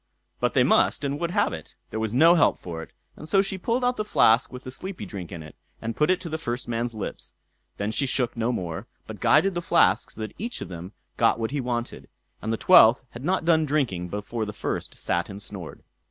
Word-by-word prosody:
But - - 0
they - - +5
must - - +3
and 140 +1 -2
would 170 - -1
have 205 - +1
it; 80 -2 -9 0.2
there 110 - -3
was 110 -1 -1
no 160 +8 +6
help 175 - +4
for 85 -2 -6
it; - - -10 0.3
and 155 - -9
so 195 -1 +4
she 195 -1 -4
pulled 235 +6 0
out 250 0 +1
the 215 - 0
flask 120 - +4
with 125 0 -9
the 130 - -7
sleepy 190 +7 -6
drink 95 -5 -7
in 85 -3 -7
it, 75 - -12 0.2
and 115 0 -4
put 150 +4 +2
it 185 0 +3
to 180 - -6
the 160 0 -3
first 120 -4 -4
man's 120 0 -2
lips; 105 - -6 0.4
then 100 +1 -2
she 135 +5 0
shook 125 -2 0
no 115 +1 0
more, 85 -8 -4 0.2
but - - -9
guided 195 0 +4
the 175 - -2
flask - - +3
so 110 - -9
that 110 - -5
each 235 +3 -4
of - - -7
them 90 +2 -8 0.2
got - - +3
what 115 +1 -2
he 145 -1 -1
wanted, 120 -1 -4 0.3
and 110 - -2
the 115 - 0
twelfth 115 +2 +7
had 120 - -9
not 180 +1 0
done 160 -2 +4
drinking 135 - 0
before 105 +4 -4
the 105 -1 -4
first - - -4
sat 85 +3 -1
and 100 0 -7
snored. 95 -4 -8
120 Hz, 240 wpm, -25 LUFS, 105-160 Hz, 0.4 s, twelfth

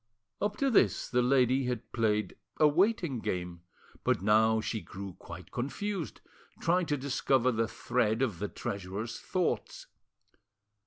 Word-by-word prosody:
Up 205 0 -1
to 275 -1 +2
this 225 - +3
the 125 0 +3
lady 130 +1 +3
had 125 -3 -3
played 105 -4 +1 0.2
a 155 - +6
waiting 170 - +2
game, 90 -4 -3 0.4
but - - +2
now 110 +2 +4
she 110 +1 -3
grew 95 -1 -8
quite 85 +1 -10
confused, 170 +8 -3 0.4
trying 175 0 +2
to 145 - 0
discover 130 -1 +2
the 115 -1 0
thread 120 0 0
of 105 -10 -1
the 105 - -1
treasurer's 100 +4 -5
thoughts. 180 -2 -2
120 Hz, 140 wpm, -31 LUFS, 105-145 Hz, 0.4 s, a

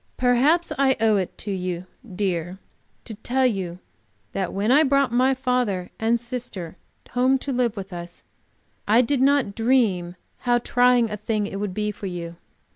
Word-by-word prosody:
"Perhaps 270 +8 +3
I 265 -1 +3
owe 220 -1 +3
it 185 -2 -3
to 205 - -5
you, 180 -2 -3 0.3
dear, 180 -2 -2 0.5
to 225 - -7
tell 255 +5 0
you 190 -7 -1 0.5
that 190 -2 -2
when 205 +4 0
I 290 +4 +6
brought 275 -3 +2
my 255 +2 +3
father 250 -8 -1
and 230 +2 +2
sister 235 -8 -6 0.4
home 255 +2 +3
to 270 +1 -4
live 240 -3 0
with 195 -1 -7
us, 175 0 -9 0.6
I 220 +4 +5
did 260 +1 0
not 275 -6 +3
dream 215 -7 +1 0.2
how 245 -1 +2
trying 245 -1 +3
a 210 - -3
thing 210 0 -1
it 195 -1 -5
would 200 -3 -3
be 210 0 -1
to 205 -1 -7
you. 170 -2 -6
225 Hz, 170 wpm, -23 LUFS, 190-250 Hz, 0.6 s, I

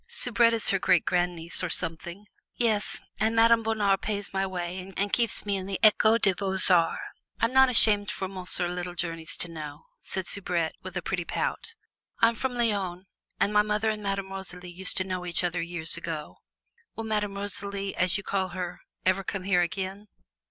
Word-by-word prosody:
Soubrette 240 - +3
is 225 - +2
her 195 - +1
great 180 -2 +3
grandniece, 175 -1 0
or 180 - -1
something." 170 +5 -4 0.3
"Yes, 220 -3 0 0.2
and 220 +1 +1
Madame 230 0 +5
Bonheur 215 -3 +2
pays 205 0 -3
my 195 0 0
way 185 +1 -5
and 200 0 -1
keeps 235 -3 +4
me 200 -1 0
in 190 0 -5
the 195 -1 -3
Ecole 215 +1 +6
des 200 -4 +3
Beaux 190 +1 -2
Arts. 165 -2 +3 0.4
I'm 230 - +2
not 265 0 +6
ashamed 210 -4 +4
for 195 -2 -3
Monsieur 185 -1 0
Littlejourneys 175 -2 -4
to - - -2
know!" 155 -2 -8
said 190 -1 -4
Soubrette 175 -4 -1
with 185 -1 -7
a 175 - -3
pretty 180 -2 -2
pout; - - -3 0.4
"I'm 230 +1 +5
from 250 +2 -3
Lyons, 195 -6 -1 0.3
and 205 - +2
my 210 - +6
mother 210 +1 0
and 215 -1 -5
Madame 195 -1 -3
Rosalie 180 -2 -7
used 180 +1 0
to 185 - +3
know 185 -1 -4
each 175 0 0
other 175 0 -1
years 170 -1 -2
ago." 165 -3 -6 0.6
"Will 225 - -4
Madame 210 -2 -1
Rosalie, 200 0 -3
as 180 +1 +2
you 205 - -6
call 190 -1 -1
her, 180 -1 -6 0.2
ever 185 +1 +2
come 190 0 -4
here 185 -2 +3
again?" 190 +3 -3
190 Hz, 185 wpm, -27 LUFS, 180-210 Hz, 0.6 s, Ecole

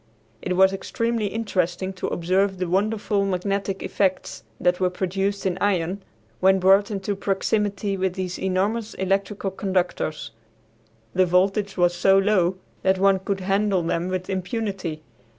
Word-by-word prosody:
It 180 - -2
was 190 0 +5
extremely 230 +2 -1
interesting 190 -4 -2
to 185 - -4
observe 190 +3 +1
the 180 0 -2
wonderful 205 +2 0
magnetic 195 +1 -2
effects 190 -2 -1 0.2
that 180 0 +2
were 185 -1 +2
produced 195 +2 -2
in 185 -1 -1
iron 190 -1 0 0.4
when 190 +1 +5
brought 195 +3 +4
into 200 -1 -2
proximity 200 +1 -1
with 185 -1 -1
these 185 -1 -4
enormous 200 +4 -1
electrical 195 +1 -1
conductors. 185 -5 -2 0.8
The 185 0 +3
voltage 195 +3 +1
was 175 -1 +3
so 195 +2 +4
low 190 -3 +3 0.3
that 190 0 +2
one 195 0 +4
could 190 0 -3
handle 195 -1 +1
them 170 +1 -1
with 185 0 -3
impunity. 190 -5 -3
190 Hz, 140 wpm, -24 LUFS, 185-200 Hz, 0.8 s, was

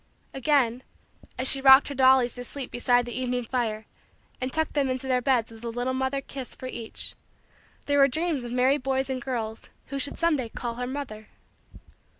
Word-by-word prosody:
Again, 265 -3 +2 0.6
as 255 - +2
she 270 - +4
rocked 265 +1 +8
her - - -4
dollies 260 -2 +4
to 245 - -6
sleep 265 +1 -6
beside 245 0 +2
the 240 - -6
evening 250 -1 -1
fire 225 -3 -2 0.6
and 255 +1 -2
tucked 315 +2 -1
them 280 -3 +1
into 255 0 -3
their 255 -1 +2
beds 245 -3 +1
with 225 0 -13
a 235 - -3
little 245 +2 -2
mother 265 +1 -1
kiss 270 -2 -8
for - - -9
each, 235 -3 -4 0.7
there 285 0 +2
were 275 - +7
dreams 310 0 -1
of 240 - -6
merry 255 +3 +3
boys 265 +1 -1
and 255 -1 -3
girls 230 -5 -4 0.2
who 275 0 -3
should 285 +1 -3
some 335 -1 +2
day 245 -4 -4
call 235 +1 -4
her 250 0 -3
mother. 250 -6 -6
255 Hz, 195 wpm, -26 LUFS, 245-275 Hz, 0.7 s, rocked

